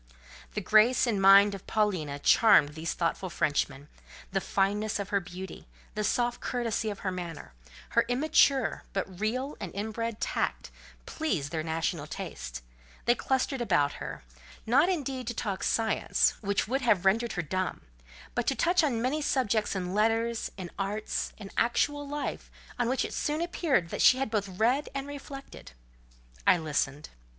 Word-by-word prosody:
The 210 - -1
grace 220 +6 +5
and 215 -5 0
mind 200 +1 +7
of 195 - -9
Paulina 185 -10 0
charmed 150 0 +5
these 160 +2 -4
thoughtful 175 +2 -1
Frenchmen: 145 -3 -1 0.4
the 195 0 0
fineness 205 +3 0
of 200 -1 -4
her 200 -2 +2
beauty, 180 - -9 0.3
the 210 - -2
soft 240 +3 0
courtesy 230 -3 -1
of 205 - -6
her 190 - -1
manner, 170 - -7 0.4
her - - +3
immature, 275 0 +3
but 190 -2 -4
real 255 +7 -1
and 190 -5 -5
inbred 220 +2 -3
tact, - - -2 0.3
pleased 185 - -2
their 160 -2 -1
national 160 -1 -2
taste; 65 - -6 0.4
they 240 - +5
clustered 265 +1 -1
about 170 -10 +2
her, 70 -1 -6 0.4
not 280 +10 +4
indeed 270 -8 -2
to 240 - -3
talk 200 -5 -3
science; 225 -1 +2
which 200 -1 0
would 265 +4 0
have 205 -7 +2
rendered 225 +5 +2
her 180 - -2
dumb, 185 +4 -2 0.5
but 240 - -1
to 270 - +2
touch 350 +3 +3
on 240 -6 0
many 290 +5 0
subjects 225 -8 +1
in 180 -1 -3
letters, 225 +2 +1
in 180 -3 -7
arts, 205 +2 -2
in 200 -2 -9
actual 290 +4 +1
life, 295 +1 -4 0.3
on 240 -1 +1
which 260 - +1
it - - -6
soon 300 +1 -1
appeared 330 - 0
that - - -3
she 255 - +7
had 265 -4 -2
both 205 -3 0
read 235 +10 +1
and 275 0 -2
reflected. 275 - -9 0.7
I - - +7
listened. 150 -2 -2
215 Hz, 160 wpm, -29 LUFS, 185-250 Hz, 0.7 s, mind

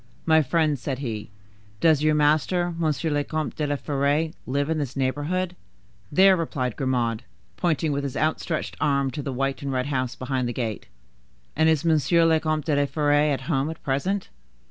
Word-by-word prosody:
—"My 160 -1 +5
friend," 155 0 +1
said 130 +1 -3
he, 115 -6 -5 0.5
"does 160 -3 +4
your 155 0 +3
master, 155 +4 +2
Monsieur 155 -1 0
le 145 0 +1
Comte 155 +1 -3
de 150 -2 -1
la 145 - 0
Fere, 145 +3 0 0.2
live 140 +2 0
in 160 0 0
this 135 -3 -4
neighborhood?" 155 +7 -1 0.6
"There," 190 +4 +6
replied 130 -8 -2
Grimaud, 120 -4 0 0.3
pointing 160 -3 0
with 140 0 -1
his 140 -2 -4
outstretched 155 +1 -1
arm 140 -2 +1
to 150 - -5
the 140 - -4
white 135 +1 -2
and 140 -1 -3
red 130 -1 -1
house 130 -3 -2
behind 130 -1 -2
the - - -3
gate. 115 -3 -4 0.7
"And 160 +1 +4
is 160 0 +1
Monsieur 165 +1 +3
le 160 -1 +4
Comte 155 -2 -1
de 155 -3 +1
la 145 0 +2
Fere 145 0 0 0.2
at 135 -2 -1
home 135 0 0
at 160 - -8
present?" 185 +9 -1
145 Hz, 190 wpm, -25 LUFS, 135-160 Hz, 0.7 s, There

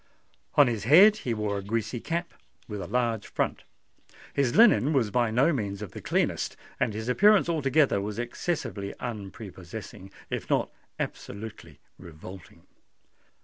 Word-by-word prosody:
On 145 - +7
his 115 -5 -2
head 195 - +7
he 125 - -3
wore 105 -2 -2
a - - -8
greasy 110 +3 -2
cap, 170 +6 -3 0.3
with 105 -2 -5
a 90 - -6
large 115 -1 -1
front: - - -2 0.7
his 135 -4 +1
linen 200 - +6
was 120 -7 +1
by 120 0 +2
no 130 +9 +3
means 100 -5 -3
of 100 - -8
the - - -9
cleanest; - - -1 0.2
and 115 -5 0
his 110 +1 -5
appearance 205 +10 +5
altogether 145 -8 +2
was 105 +1 -5
excessively 120 - -3
unprepossessing—if 100 -3 -8
not - - +1 0.3
absolutely 105 +2 -7 0.2
revolting. 90 +1 -12
115 Hz, 140 wpm, -27 LUFS, 100-140 Hz, 0.7 s, On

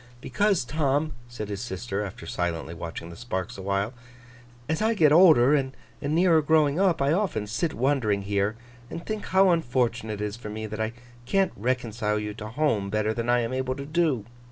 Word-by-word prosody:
'Because, 200 0 +1
Tom,' 145 +2 0
said 120 -3 -6
his 100 -1 -4
sister, 105 -2 -3
after 95 -4 -8
silently 85 -1 -3
watching 85 0 -7
the - - -10
sparks 95 -5 -4
awhile, 100 +3 -2 0.7
'as 160 +4 -1
I 225 +1 +2
get 155 -7 +5
older, 150 -6 +7
and 135 -2 0 0.3
nearer 160 +3 +3
growing 155 0 +3
up, 180 -7 +3
I 140 +2 +3
often 185 - 0
sit 155 +10 -2
wondering 120 -6 +1
here, 100 +1 0 0.3
and 170 - -7
think 215 -1 -4
how 190 0 +5
unfortunate 120 -8 0
it 105 - -1
is 105 0 -4
for 115 -3 -8
me 110 +1 -5
that 110 +1 -5
I 110 +1 -2 0.3
can't 195 +6 +2
reconcile 115 -2 -1
you 105 0 -3
to 105 0 -7
home 110 -5 0
better 110 +1 0
than 115 +1 -3
I 120 0 +4
am 115 +2 -3
able 130 0 -1
to 140 0 -6
do. 150 -8 +1
120 Hz, 190 wpm, -26 LUFS, 105-155 Hz, 0.7 s, older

